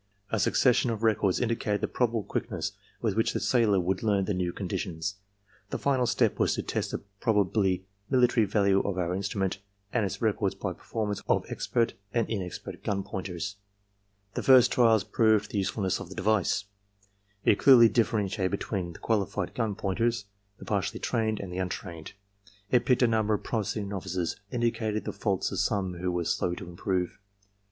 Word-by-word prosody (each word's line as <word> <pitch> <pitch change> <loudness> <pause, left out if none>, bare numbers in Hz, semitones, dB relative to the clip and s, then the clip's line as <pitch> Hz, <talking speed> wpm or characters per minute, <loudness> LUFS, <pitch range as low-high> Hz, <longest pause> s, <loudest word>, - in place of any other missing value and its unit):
A 110 - +1
succession 125 +3 +3
of 115 -1 -3
records 105 -4 +2
in 125 - +1
dicated 105 -2 -1
the - - 0
probable 115 -3 0
quickness - - -3 0.3
with - - 0
which - - +1
the - - -1
sailor 110 -6 +3
would 90 +1 -1
learn 100 -3 +2
the 105 - -1
new 90 -1 -1
coordinations. 95 -1 -3 0.6
The - - -2
final 130 -3 +1
step - - +1
was - - +2
to - - -3
test - - -2
the - - -4 0.2
probably 100 -4 +1 0.2
military 125 -4 +4
value 100 -1 +3
of 100 -2 -2
our 90 -1 0
instrument 95 0 -2 0.3
and 120 - +2
its 95 - -3
records 105 -3 0
by 95 -1 -3
performances 105 +1 -4
of - - +2
expert 115 -1 0 0.2
and 115 -2 +2
inexpert 95 -6 -5
gun 100 -1 -1
pointers. 95 +1 -5 0.8
"The - - -2
first 130 -2 +6
trials 115 -4 +4
proved 110 -2 +2
the 105 - 0
usefulness 95 0 -1
of - - -8
the 95 - -9
device. 100 -1 +1 0.8
It 100 - +4
clearly 125 -4 +8
differentiated 105 -4 +1
between 95 -3 -3
the - - -11
qualified 100 -4 -1
gun 110 -4 -1
pointers, 110 +2 0 0.3
the - - -11
partially 105 +2 -1
trained, 110 -3 0
and 95 -3 -6
the 90 - -3
untrained. 90 -3 -5 0.6
It 125 0 +3
picked 125 -1 +4
a - - +6
number 110 -2 +2
of - - -6
promising 105 -2 -2
novices 95 -3 -3 0.2
and 120 -2 -2
indicated 110 -2 0
the - - -3
faults 100 -4 -1
of - - -2
some 95 -4 0
who 90 0 -1
were 90 -1 -1
slow 85 +2 0
to 95 -1 -8
improve. 90 +1 -2
100 Hz, 180 wpm, -28 LUFS, 95-115 Hz, 0.8 s, clearly